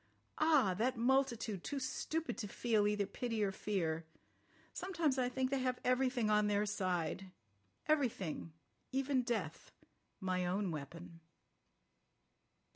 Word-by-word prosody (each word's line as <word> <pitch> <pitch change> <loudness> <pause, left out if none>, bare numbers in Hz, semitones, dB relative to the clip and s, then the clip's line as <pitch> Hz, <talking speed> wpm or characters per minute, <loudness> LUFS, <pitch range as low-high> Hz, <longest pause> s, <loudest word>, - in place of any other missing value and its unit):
Ah! 300 - +5
that 250 +2 +1
multitude, 235 -5 +1
too 285 - -3
stupid 290 +5 -2
to 210 - -3
feel 215 0 +2
either 210 -1 +1
pity 225 +1 -2
or 195 - +1
fear. 170 -5 -1 0.7
Sometimes 330 -8 0
I 250 -1 +2
think 260 +1 -1
they 275 - +2
have 255 -1 0
everything 250 -2 +2
on 210 0 +4
their 205 0 +2
side. 185 -2 -1 0.6
Everything—even 255 - -1
death—my 190 -5 -4
own 185 +1 0
weapon." 165 +3 -7
220 Hz, 115 wpm, -36 LUFS, 190-260 Hz, 0.7 s, Ah